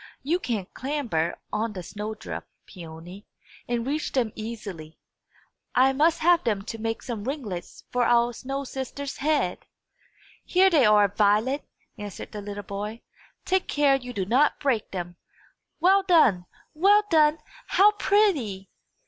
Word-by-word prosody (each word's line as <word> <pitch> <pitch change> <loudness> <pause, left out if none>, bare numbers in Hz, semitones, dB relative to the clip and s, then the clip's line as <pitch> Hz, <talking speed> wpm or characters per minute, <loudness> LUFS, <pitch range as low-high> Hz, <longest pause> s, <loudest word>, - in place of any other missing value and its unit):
You 330 +6 +1
can 220 - -2
clamber 245 - -2 0.2
on 215 +1 -1
the 185 -3 -6
snow 210 +4 -6
drift, 215 - -7 0.2
Peony, 175 +2 -11 0.4
and 235 -1 -1
reach 295 +3 -2
them 240 -5 +1
easily. 205 -8 -7 0.8
I 265 +1 +5
must 320 +4 +2
have 345 +1 +4
them 210 -4 -1
to 225 +2 -7
make 225 0 -3
some 230 -4 -5
ringlets 245 - -5
for 250 0 +1
our 240 0 +3
snow 270 +3 -4
sister's 270 +1 -6
head!" 285 -10 0 0.8
"Here 380 +1 +4
they 295 -7 +5
are, 210 -1 +5
Violet!" 215 +7 +1 0.3
answered 205 -2 -7
the 210 - -6
little 205 0 -6
boy. 205 +3 -6 0.4
"Take 375 0 +1
care 290 -2 +3
you 250 -2 -5
do 200 -6 -2
not 265 +8 +2
break 255 -7 0
them. 175 -2 -6 0.6
Well 380 +4 +5
done! 305 - +3 0.3
Well 400 +6 +5
done! 305 -1 +5 0.3
How 410 +2 +5
pretty!" 330 - +1
240 Hz, 145 wpm, -25 LUFS, 205-295 Hz, 0.8 s, I